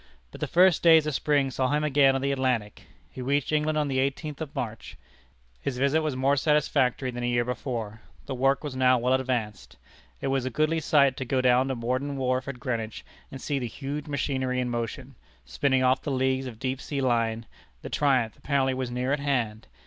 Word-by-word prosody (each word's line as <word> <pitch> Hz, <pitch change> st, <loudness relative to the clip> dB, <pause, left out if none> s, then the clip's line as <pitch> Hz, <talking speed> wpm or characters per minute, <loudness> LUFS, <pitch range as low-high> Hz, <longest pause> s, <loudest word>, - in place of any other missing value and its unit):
But -, -, -12 dB
the -, -, -1 dB
first 180 Hz, -1 st, +4 dB
days 160 Hz, -2 st, +6 dB
of 155 Hz, -, -2 dB
spring 140 Hz, -1 st, +1 dB
saw 130 Hz, 0 st, 0 dB
him 150 Hz, +1 st, +1 dB
again 140 Hz, -2 st, +4 dB
on 135 Hz, -, -1 dB
the 140 Hz, +1 st, 0 dB
Atlantic. 125 Hz, -6 st, -2 dB, 0.2 s
He 130 Hz, -, -8 dB
reached 140 Hz, +3 st, 0 dB
England 155 Hz, 0 st, +1 dB
on 150 Hz, -1 st, +1 dB
the 135 Hz, -1 st, 0 dB
eighteenth 140 Hz, +3 st, -2 dB
of 150 Hz, -2 st, -6 dB
March. 115 Hz, -2 st, -5 dB, 0.6 s
His 125 Hz, -, -3 dB
visit 140 Hz, +4 st, +2 dB
was 155 Hz, -4 st, -2 dB
more 135 Hz, +2 st, +2 dB
satisfactory 135 Hz, -3 st, +1 dB
than 120 Hz, 0 st, -6 dB
a -, -, 0 dB
year 120 Hz, 0 st, +1 dB
before. 115 Hz, -4 st, -4 dB, 0.2 s
The 140 Hz, -, -4 dB
work 135 Hz, +2 st, +1 dB
was 145 Hz, -3 st, -5 dB
now 130 Hz, 0 st, +4 dB
well 125 Hz, +2 st, +1 dB
advanced. 120 Hz, -, -2 dB, 0.4 s
It 135 Hz, -, -2 dB
was 135 Hz, -1 st, 0 dB
a 130 Hz, -, -2 dB
goodly 155 Hz, +5 st, +1 dB
sight 140 Hz, -4 st, +3 dB
to -, -, -3 dB
go 130 Hz, +2 st, 0 dB
down 130 Hz, +1 st, +3 dB
to 135 Hz, -, -2 dB
Morden 130 Hz, +4 st, -2 dB
Wharf 130 Hz, 0 st, -1 dB
at 140 Hz, -3 st, -6 dB
Greenwich, 115 Hz, -3 st, -4 dB, 0.3 s
and 135 Hz, -, -7 dB
see 140 Hz, +1 st, -2 dB
the 125 Hz, -, -3 dB
huge 140 Hz, +6 st, -6 dB
machinery 130 Hz, -3 st, -1 dB
in 125 Hz, -1 st, -1 dB
motion, 120 Hz, +3 st, -4 dB, 0.3 s
spinning 130 Hz, -, +1 dB
off 130 Hz, +1 st, +3 dB
the -, -, -4 dB
leagues 130 Hz, 0 st, 0 dB
of 120 Hz, -3 st, -8 dB
deep 130 Hz, +2 st, -3 dB
sea 145 Hz, -, -4 dB
line. 115 Hz, -3 st, 0 dB, 0.4 s
The -, -, -6 dB
triumph 130 Hz, -6 st, +1 dB
apparently 135 Hz, -2 st, 0 dB
was 130 Hz, -1 st, -3 dB
near 125 Hz, +2 st, -1 dB
at 145 Hz, -, 0 dB
hand. 120 Hz, -7 st, -2 dB
130 Hz, 210 wpm, -26 LUFS, 125-140 Hz, 0.6 s, days